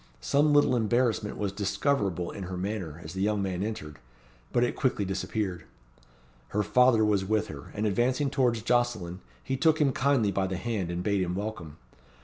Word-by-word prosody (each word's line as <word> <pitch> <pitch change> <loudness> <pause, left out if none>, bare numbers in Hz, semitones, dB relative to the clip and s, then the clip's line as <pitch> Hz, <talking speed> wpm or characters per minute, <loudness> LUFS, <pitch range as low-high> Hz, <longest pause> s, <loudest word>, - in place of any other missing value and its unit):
Some 145 - +2
little 145 -3 +4
embarrassment 115 -2 +1
was 100 -2 -1
discoverable 100 - -1
in 100 - -6
her 90 0 -5
manner 90 -5 -4
as 80 - -8
the 95 - -3
young 105 +1 +1
man 95 -2 -2
entered; 75 - -5 0.5
but 120 - +2
it 120 - 0
quickly 125 -7 0
disappeared. 95 -2 -3 0.8
Her 105 +1 0
father 125 -1 +4
was 105 -2 +2
with 110 +1 0
her; 70 -2 -9
and 105 - -1
advancing 125 +7 +1
towards 120 -6 +1
Jocelyn, 110 -8 0 0.2
he 135 - -2
took 160 +4 +3
him 145 -3 +3
kindly 130 -6 +2
by 95 -1 0
the 95 0 -3
hand, 100 -3 -2
and 85 +1 -3
bade 100 0 +1
him 90 -1 -1
welcome. 95 -7 -5
105 Hz, 180 wpm, -28 LUFS, 95-120 Hz, 0.8 s, little